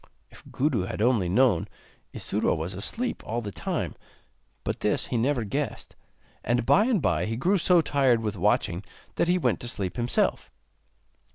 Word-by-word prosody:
If -, -, -15 dB
Gudu 125 Hz, -9 st, 0 dB
had -, -, -5 dB
only 110 Hz, -5 st, +2 dB
known, 110 Hz, -3 st, +3 dB, 0.4 s
Isuro -, -, -1 dB
was 80 Hz, +3 st, -4 dB
asleep 225 Hz, -, -3 dB
all 115 Hz, +2 st, -2 dB
the 105 Hz, -4 st, -5 dB
time; -, -, -3 dB, 0.7 s
but -, -, -3 dB
this -, -, 0 dB
he -, -, -4 dB
never 125 Hz, +1 st, +1 dB
guessed, 100 Hz, -, -4 dB, 0.5 s
and 120 Hz, 0 st, 0 dB
by 210 Hz, -, +5 dB
and 230 Hz, -, +1 dB
bye 85 Hz, 0 st, +1 dB
he 115 Hz, -, -2 dB
grew 185 Hz, +9 st, +2 dB
so 175 Hz, 0 st, +5 dB
tired 135 Hz, -6 st, +2 dB
with 105 Hz, -2 st, -2 dB
watching 95 Hz, -1 st, +1 dB, 0.3 s
that -, -, +2 dB
he 180 Hz, +1 st, +3 dB
went 125 Hz, -10 st, +1 dB
to 120 Hz, -, -6 dB
sleep 95 Hz, -6 st, -3 dB
himself. 120 Hz, 0 st, 0 dB
120 Hz, 170 wpm, -26 LUFS, 100-145 Hz, 0.7 s, by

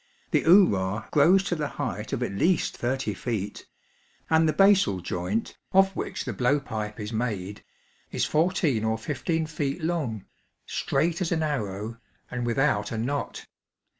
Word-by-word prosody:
The -, -, +2 dB
oorah 105 Hz, -, +4 dB
grows 180 Hz, +6 st, +5 dB
to 180 Hz, -, -1 dB
the 150 Hz, -2 st, -2 dB
height 110 Hz, -7 st, -3 dB
of 125 Hz, -, -1 dB
at 125 Hz, -, -2 dB
least 165 Hz, -, +1 dB
thirty 125 Hz, -3 st, -1 dB
feet; 105 Hz, -1 st, -4 dB, 0.6 s
and 160 Hz, 0 st, +5 dB
the -, -, +4 dB
basal 195 Hz, -, +4 dB
joint, 90 Hz, +5 st, -3 dB, 0.2 s
of 195 Hz, 0 st, +5 dB
which -, -, -4 dB
the 125 Hz, -, -3 dB
blow 125 Hz, +7 st, +2 dB
pipe 110 Hz, -5 st, -5 dB
is 105 Hz, +2 st, -5 dB
made, 105 Hz, -4 st, -3 dB, 0.5 s
is -, -, 0 dB
fourteen 155 Hz, -, +1 dB
or 110 Hz, 0 st, +1 dB
fifteen 155 Hz, +6 st, -2 dB
feet 155 Hz, 0 st, -3 dB
long, 145 Hz, -, -2 dB, 0.4 s
straight 170 Hz, +3 st, 0 dB
as 175 Hz, -, -1 dB
an 160 Hz, -2 st, +1 dB
arrow, 110 Hz, -6 st, -3 dB, 0.3 s
and 120 Hz, -1 st, -2 dB
without 120 Hz, -4 st, +1 dB
a 115 Hz, -, -3 dB
knot. 140 Hz, +6 st, -3 dB
130 Hz, 155 wpm, -26 LUFS, 110-160 Hz, 0.6 s, grows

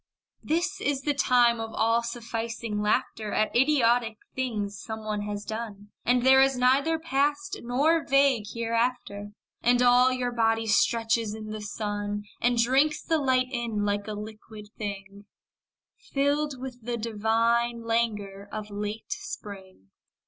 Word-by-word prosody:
This 345 Hz, +5 st, -1 dB
is 280 Hz, -2 st, -1 dB
the 290 Hz, -, +1 dB
time 245 Hz, -4 st, +3 dB
of 225 Hz, 0 st, -5 dB
all 230 Hz, +1 st, +2 dB
sufficing 230 Hz, -2 st, -4 dB
laughter 210 Hz, 0 st, -1 dB
At 215 Hz, -, 0 dB
idiotic 240 Hz, -4 st, +3 dB, 0.2 s
things 210 Hz, -6 st, -3 dB
some 220 Hz, -1 st, -7 dB
one 210 Hz, -1 st, -2 dB
has 205 Hz, 0 st, -4 dB
done, 210 Hz, -2 st, -6 dB
And 245 Hz, +1 st, +2 dB
there 265 Hz, +1 st, +7 dB
is 270 Hz, -1 st, +3 dB
neither 275 Hz, +6 st, +3 dB
past 295 Hz, +4 st, -1 dB
nor 295 Hz, +7 st, +2 dB
vague 275 Hz, -5 st, +3 dB
hereafter. 230 Hz, -3 st, -2 dB, 0.3 s
And 245 Hz, +1 st, +3 dB
all 250 Hz, +1 st, +5 dB
your 250 Hz, -1 st, -1 dB
body 225 Hz, -1 st, +1 dB
stretches 225 Hz, 0 st, +2 dB
in 215 Hz, -1 st, -7 dB
the 215 Hz, 0 st, -5 dB
sun 205 Hz, -1 st, -3 dB, 0.2 s
And 240 Hz, 0 st, +2 dB
drinks 270 Hz, +6 st, +3 dB
the 320 Hz, -1 st, +1 dB
light 255 Hz, -2 st, +2 dB
in 230 Hz, -5 st, -2 dB
like 205 Hz, 0 st, -1 dB
a 215 Hz, -, -3 dB
liquid 210 Hz, 0 st, -9 dB
thing; 200 Hz, -1 st, -7 dB, 0.9 s
Filled 285 Hz, 0 st, 0 dB
with 250 Hz, -2 st, -8 dB
the 240 Hz, +1 st, -2 dB
divine 230 Hz, +2 st, +1 dB
languor 210 Hz, -4 st, -2 dB
of 215 Hz, -1 st, -6 dB
late 210 Hz, +2 st, -5 dB
spring. 195 Hz, -, -8 dB
230 Hz, 140 wpm, -27 LUFS, 210-255 Hz, 0.9 s, there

